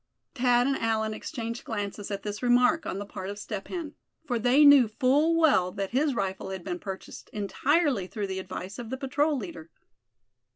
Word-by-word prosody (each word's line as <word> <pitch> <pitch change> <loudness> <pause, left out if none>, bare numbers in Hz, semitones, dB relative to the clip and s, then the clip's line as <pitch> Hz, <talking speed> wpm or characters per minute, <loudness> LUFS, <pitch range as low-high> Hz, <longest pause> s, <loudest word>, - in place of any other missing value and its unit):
Thad 245 -2 +3
and 275 0 +1
Allan 220 -1 0
exchanged 230 -1 -5
glances 205 -2 -4
at 200 -1 -4
this 210 0 -5
remark 245 +5 +3
on - - -3
the 205 - -5
part 190 -1 -7
of 205 - -6
Step 210 -1 -6
Hen; 330 -5 -5 0.3
for 245 -5 -1
they 250 +6 +5
knew 285 -4 +8
full 280 +9 +2
well 230 - +4
that 195 -1 -3
his 275 +2 +1
rifle 190 -3 -3
had 190 -2 -6
been 180 -1 -4
purchased 190 0 -8
entirely 255 - +1
through 205 +1 -4
the 190 -1 -4
advice 185 +2 -7
of 235 -2 -6
the 260 - -3
patrol 285 +2 0
leader. 170 -7 -7
225 Hz, 190 wpm, -27 LUFS, 195-270 Hz, 0.3 s, knew